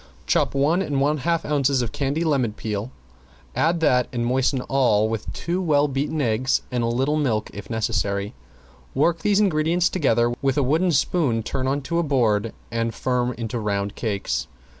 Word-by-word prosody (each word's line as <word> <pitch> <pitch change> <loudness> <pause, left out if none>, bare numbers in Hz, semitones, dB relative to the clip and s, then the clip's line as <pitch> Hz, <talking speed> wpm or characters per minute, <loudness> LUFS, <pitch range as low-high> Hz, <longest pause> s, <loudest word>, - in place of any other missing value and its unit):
Chop 65 - +1
one 150 +7 +2
and 145 -2 0
half 170 +3 0
ounces 140 -3 +1
of 115 - -4
candied 145 +4 -1
lemon 130 -8 +1
peel, 105 +1 -4 0.7
add 165 +1 +1
that 125 -5 +3
and 120 -2 -2
moisten 130 +1 +1
all 120 -6 +2
with 110 -1 -4
two 175 +2 -2
well 150 -4 +3
beaten 145 +3 -2
eggs 125 0 +1
and 125 -1 0
a - - +1
little 135 +6 +1
milk 120 -8 0
if 105 - -9
necessary. 105 -3 -1 0.6
Work 170 -1 +2
these 200 +4 +2
ingredients 175 -2 +2
together, 120 -8 +1
with 135 -1 +1
a 145 - +3
wooden 160 +7 +2
spoon 135 -6 +1
turn 130 +3 -2
on 140 +2 0
to 170 +4 -1
a - - +1
board 115 -7 +1 0.2
and 115 -1 -2
form 125 -1 0
into 115 +1 -4
round 100 -1 -2
cakes. 105 -4 -2
130 Hz, 175 wpm, -23 LUFS, 115-150 Hz, 0.7 s, that